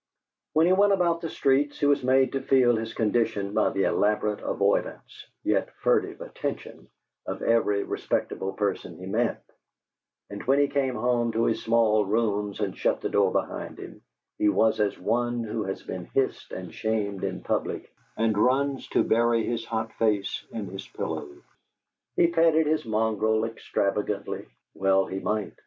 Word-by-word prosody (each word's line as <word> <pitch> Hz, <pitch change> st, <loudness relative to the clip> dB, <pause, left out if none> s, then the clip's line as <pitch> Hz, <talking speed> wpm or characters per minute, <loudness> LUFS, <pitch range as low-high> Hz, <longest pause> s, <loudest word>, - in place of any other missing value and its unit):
When 160 Hz, +2 st, +4 dB
he 180 Hz, -, +4 dB
went 200 Hz, +1 st, +4 dB
about 170 Hz, -3 st, +1 dB
the 165 Hz, -, -3 dB
streets 140 Hz, +1 st, +1 dB
he -, -, +1 dB
was 145 Hz, -1 st, +3 dB
made 130 Hz, +1 st, +3 dB
to 135 Hz, -, -2 dB
feel 130 Hz, -3 st, +4 dB
his 115 Hz, 0 st, -3 dB
condition 105 Hz, -3 st, 0 dB
by 110 Hz, -, +3 dB
the 95 Hz, -, 0 dB
elaborate 105 Hz, 0 st, +1 dB
avoidance, -, -, -1 dB, 0.2 s
yet -, -, +1 dB
furtive -, -, 0 dB
attention, -, -, -6 dB, 0.4 s
of -, -, -4 dB
every 105 Hz, -3 st, +2 dB
respectable 95 Hz, 0 st, -2 dB
person 100 Hz, 0 st, -2 dB
he -, -, -9 dB
met; -, -, -1 dB, 0.9 s
and 100 Hz, -, -6 dB
when 135 Hz, +1 st, +3 dB
he 145 Hz, 0 st, +4 dB
came 135 Hz, -3 st, 0 dB
home 120 Hz, 0 st, +1 dB
to 115 Hz, +1 st, +1 dB
his 115 Hz, -, +1 dB
small 110 Hz, -2 st, +3 dB
rooms 105 Hz, -1 st, -1 dB
and 100 Hz, -3 st, -2 dB
shut -, -, 0 dB
the -, -, -2 dB
door -, -, +3 dB
behind -, -, -3 dB
him, -, -, -10 dB, 0.4 s
he 105 Hz, -, +4 dB
was 110 Hz, +2 st, +2 dB
as 105 Hz, -1 st, +1 dB
one 120 Hz, +4 st, 0 dB
who 110 Hz, -1 st, -3 dB
has 95 Hz, -, -5 dB
been 90 Hz, -2 st, -6 dB
hissed 135 Hz, +7 st, -1 dB
and 90 Hz, -3 st, -7 dB
shamed 105 Hz, -3 st, -2 dB
in -, -, -3 dB
public -, -, -2 dB, 0.2 s
and 110 Hz, -1 st, +2 dB
runs 135 Hz, +3 st, +1 dB
to -, -, +2 dB
bury 115 Hz, 0 st, +2 dB
his 115 Hz, -1 st, -2 dB
hot 110 Hz, -1 st, -3 dB
face 105 Hz, -3 st, 0 dB
in 110 Hz, -3 st, -4 dB
his 95 Hz, +1 st, -8 dB
pillow. 75 Hz, -, -4 dB, 0.9 s
He -, -, +5 dB
petted 165 Hz, -1 st, +3 dB
his 155 Hz, -2 st, 0 dB
mongrel 110 Hz, 0 st, +1 dB
extravagantly 105 Hz, -2 st, -2 dB, 0.3 s
(well 95 Hz, 0 st, +2 dB
he 95 Hz, -, -4 dB
might!) 105 Hz, -2 st, -2 dB
115 Hz, 165 wpm, -26 LUFS, 105-130 Hz, 0.9 s, He